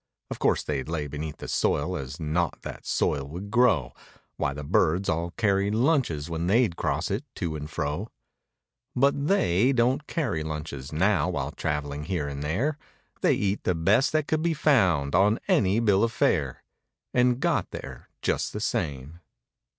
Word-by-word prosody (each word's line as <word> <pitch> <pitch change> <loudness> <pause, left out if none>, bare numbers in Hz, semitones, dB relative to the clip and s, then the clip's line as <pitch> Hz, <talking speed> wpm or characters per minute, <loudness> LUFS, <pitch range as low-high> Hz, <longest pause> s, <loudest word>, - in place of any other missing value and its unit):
(Of - - -5
course - - +2
they'd 70 -1 -3
lay 80 -3 -2
beneath 75 +1 -5
the - - -8
soil - - 0
as 70 +3 -6
naught 80 +2 -1
that - - -8
soil 70 -2 +1
would 90 +7 -7
grow, 115 - +3 0.4
Why - - -1
the 75 +1 -6
birds 85 +6 +2
all 85 +2 0
carried 100 -2 +2
lunches 120 - +1
when 85 0 -3
they'd 110 -2 +3
cross 75 +4 -1
it 105 +8 -1
to 85 -5 -3
and 75 0 -6
fro) 80 +7 -3 0.9
But 140 +2 +2
they 120 - +3
don't 130 +4 +1
carry 125 - -1
lunches 75 -3 -5
now 95 +6 +2
while - - -2
traveling 75 0 -3
here 85 -5 -2
and 70 0 -5
there. 125 - -1 0.4
They - - +4
eat 100 0 -1
the 90 - +1
best 105 - +3
that 155 -1 +1
could 155 0 0
be 165 0 +1
found 90 - +3
on 100 +4 +4
any 100 +2 +3
bill 105 -3 +3
of 115 - +1
fare— - - 0 0.5
And 125 0 +3
got 150 - 0
there - - -9
just - - 0
the - - -3
same. 75 +2 -3
90 Hz, 170 wpm, -26 LUFS, 75-120 Hz, 0.9 s, They